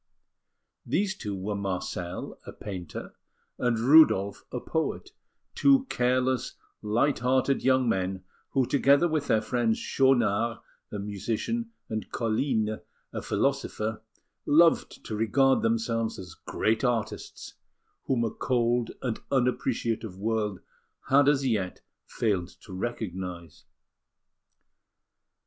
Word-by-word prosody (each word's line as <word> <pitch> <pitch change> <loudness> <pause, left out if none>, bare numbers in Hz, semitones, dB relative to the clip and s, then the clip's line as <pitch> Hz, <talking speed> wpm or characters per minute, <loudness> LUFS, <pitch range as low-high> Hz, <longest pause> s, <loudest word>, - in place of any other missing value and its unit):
These 195 -1 0
two 105 - -5
were 95 +2 -3
Marcel, 90 -2 -4
a - - -5
painter, 90 -6 -7 0.5
and 120 -2 +1
Rudolf, 115 -6 +5
a 125 - -3
poet; 160 - -2 0.4
two 275 -1 +4
careless, 125 0 +1 0.3
light 115 +7 +1
hearted 130 +2 +2
young 130 -1 +3
men, 95 -3 -1 0.3
who, 135 -2 +2
together 140 +5 +4
with 155 -3 -1
their 110 0 +2
friends, 115 -1 +1
Schaunard, 115 -4 +2 0.3
a 105 - -4
musician, 110 - -3 0.2
and 110 -3 -4
Colline, 110 -2 0 0.3
a - - -3
philosopher, 110 +1 -1 0.5
loved 165 +3 +4
to 110 - -4
regard 130 +5 +3
themselves 115 0 0
as 90 -3 -9
great 110 +7 -1
artists, 120 -4 -2 0.5
whom 125 -3 +1
a 115 - -1
cold 120 -1 +1
and 120 -4 -2
unappreciative 115 -5 0
world 105 -2 -1 0.5
had 140 +1 +6
as 140 -2 +2
yet 105 -7 -1 0.3
failed 100 -6 0
to 100 - -11
recognise. 90 -5 -5
115 Hz, 110 wpm, -28 LUFS, 105-130 Hz, 0.5 s, had